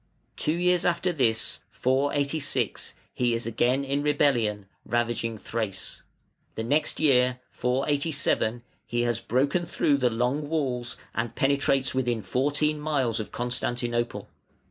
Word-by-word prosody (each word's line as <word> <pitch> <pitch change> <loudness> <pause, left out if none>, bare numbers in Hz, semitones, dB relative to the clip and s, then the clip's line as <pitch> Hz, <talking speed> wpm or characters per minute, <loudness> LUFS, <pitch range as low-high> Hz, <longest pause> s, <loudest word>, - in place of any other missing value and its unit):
Two 155 - 0
years 180 0 +3
after 175 +1 +1
this 115 -7 0
(486) 140 -1 0 0.2
he 120 -1 +1
is 115 - -3
again 125 +4 +1
in 140 +1 -1
rebellion, 120 -9 +2 0.2
ravaging 120 -1 -1
Thrace; 110 -2 -4 0.5
the 110 - -3
next 145 +7 +1
year 125 -4 +4
(487) 135 -3 0 0.2
he 120 0 0
has 120 -1 0
broken 140 +10 +1
through 145 -4 +2
the 125 -2 +2
Long 125 +6 -1
Walls 130 -7 -1 0.2
and 115 0 -2
penetrates 135 -1 +2
within 120 -4 0
fourteen 145 +8 +1
miles 135 -7 0
of 110 - -5
Constantinople. 120 -1 -2
130 Hz, 120 wpm, -27 LUFS, 120-145 Hz, 0.5 s, year